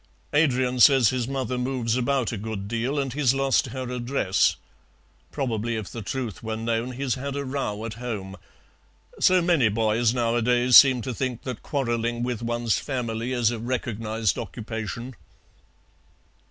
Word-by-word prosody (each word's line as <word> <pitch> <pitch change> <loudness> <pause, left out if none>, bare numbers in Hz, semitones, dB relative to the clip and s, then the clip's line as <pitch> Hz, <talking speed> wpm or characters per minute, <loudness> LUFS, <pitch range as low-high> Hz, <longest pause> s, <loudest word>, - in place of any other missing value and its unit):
Adrian 130 -4 +2
says 130 -4 +7
his 125 -2 -2
mother 130 -2 -2
moves 125 -3 -1
about 130 -1 0
a 115 - -4
good 100 -1 -5
deal 120 +6 -2
and 135 -3 -1
he's 135 -2 +2
lost 135 -1 +2
her 130 +1 -5
address. 120 -6 +1 0.8
Probably, 115 -4 -2
if 110 -3 -5
the 115 - -6
truth 115 -1 -4
were 110 -1 -3
known, 115 +2 -2
he's 130 0 -1
had 140 +1 -4
a 140 0 -3
row 130 -6 -3
at 115 - -5
home. 100 -6 -5 0.8
So 185 -2 +4
many 165 -10 +3
boys 110 +2 +2
nowadays 120 +1 +2
seem 130 -4 +8
to 130 - -3
think 125 -1 -3
that 125 -4 -5
quarrelling 120 -3 -1
with 120 -2 -3
one's 120 -1 0
family 120 -3 -3
is 120 -3 +2
a 120 - -4
recognized 115 -3 -2
occupation." 115 +2 -6
120 Hz, 155 wpm, -25 LUFS, 115-130 Hz, 0.8 s, seem